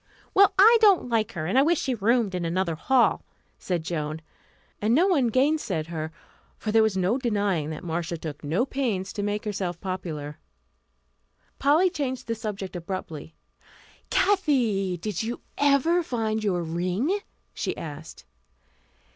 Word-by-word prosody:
"Well, 400 Hz, +1 st, +6 dB
I 450 Hz, +4 st, +7 dB
don't 395 Hz, -, +5 dB
like 225 Hz, -1 st, 0 dB
her, 155 Hz, -3 st, -4 dB
and 195 Hz, +10 st, +2 dB
I -, -, +6 dB
wish 325 Hz, +3 st, +3 dB
she 260 Hz, -, -1 dB
roomed 230 Hz, -1 st, +1 dB
in 180 Hz, -1 st, -2 dB
another 170 Hz, +1 st, 0 dB
hall," 245 Hz, +10 st, +2 dB, 0.4 s
said 175 Hz, -3 st, -2 dB
Joan; 155 Hz, -2 st, -3 dB, 0.6 s
and 220 Hz, +3 st, +3 dB
no 340 Hz, +6 st, +5 dB
one 310 Hz, -11 st, +3 dB
gainsaid 245 Hz, -, 0 dB
her, 160 Hz, -1 st, -4 dB, 0.5 s
for 215 Hz, -, -3 dB
there 225 Hz, +1 st, +5 dB
was 220 Hz, -3 st, +1 dB
no 190 Hz, +8 st, +1 dB
denying 200 Hz, -, 0 dB
that 155 Hz, -, -6 dB
Marcia 170 Hz, 0 st, -3 dB
took 155 Hz, -2 st, -7 dB
no 165 Hz, -, +1 dB
pains 230 Hz, -9 st, -2 dB
to 205 Hz, -, -3 dB
make 205 Hz, +1 st, -2 dB
herself 190 Hz, -5 st, -3 dB
popular. 160 Hz, -6 st, -5 dB, 1.2 s
Polly 315 Hz, +7 st, +4 dB
changed 265 Hz, -7 st, -3 dB
the 230 Hz, -, -2 dB
subject 210 Hz, -4 st, -5 dB
abruptly. 165 Hz, -3 st, -6 dB, 0.7 s
"Kathy, 235 Hz, -, +2 dB
did 195 Hz, +1 st, -3 dB
you 230 Hz, +2 st, -4 dB, 0.2 s
ever 285 Hz, +5 st, +3 dB
find 220 Hz, -7 st, -2 dB
your 180 Hz, -4 st, 0 dB
ring?" 180 Hz, -, -1 dB, 0.3 s
she -, -, -3 dB
asked. 155 Hz, 0 st, -8 dB
205 Hz, 150 wpm, -26 LUFS, 170-260 Hz, 1.2 s, I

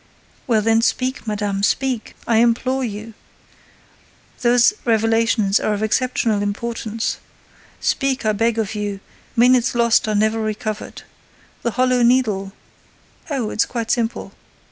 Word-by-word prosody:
"Well, 220 Hz, -4 st, +2 dB
then, 225 Hz, +1 st, +3 dB
speak 255 Hz, +1 st, -1 dB
madame, 205 Hz, -2 st, -2 dB
speak, 255 Hz, +2 st, -1 dB
I 230 Hz, -, +2 dB
implore 245 Hz, +3 st, +2 dB
you! 220 Hz, 0 st, -6 dB, 1.3 s
Those 245 Hz, -, +4 dB
revelations 225 Hz, -2 st, +2 dB
are 215 Hz, -, 0 dB
of 205 Hz, -, -3 dB
exceptional 220 Hz, -2 st, 0 dB
importance. 225 Hz, +1 st, -3 dB, 0.6 s
Speak, 270 Hz, -3 st, 0 dB
I 215 Hz, -, +3 dB
beg 225 Hz, +2 st, 0 dB
of 220 Hz, -2 st, -1 dB
you: 205 Hz, -2 st, -3 dB, 0.4 s
minutes 245 Hz, 0 st, +4 dB
lost 235 Hz, -2 st, +3 dB
are 215 Hz, -, 0 dB
never 215 Hz, +2 st, +1 dB
recovered. 215 Hz, 0 st, -4 dB, 0.6 s
The 235 Hz, -, -2 dB
Hollow 255 Hz, -1 st, +3 dB
Needle—" 225 Hz, -6 st, +2 dB, 0.8 s
"Oh, 255 Hz, -7 st, -2 dB
it's 215 Hz, -, +1 dB
quite 230 Hz, -2 st, -3 dB
simple. 235 Hz, -2 st, -2 dB
225 Hz, 125 wpm, -20 LUFS, 215-240 Hz, 1.3 s, Those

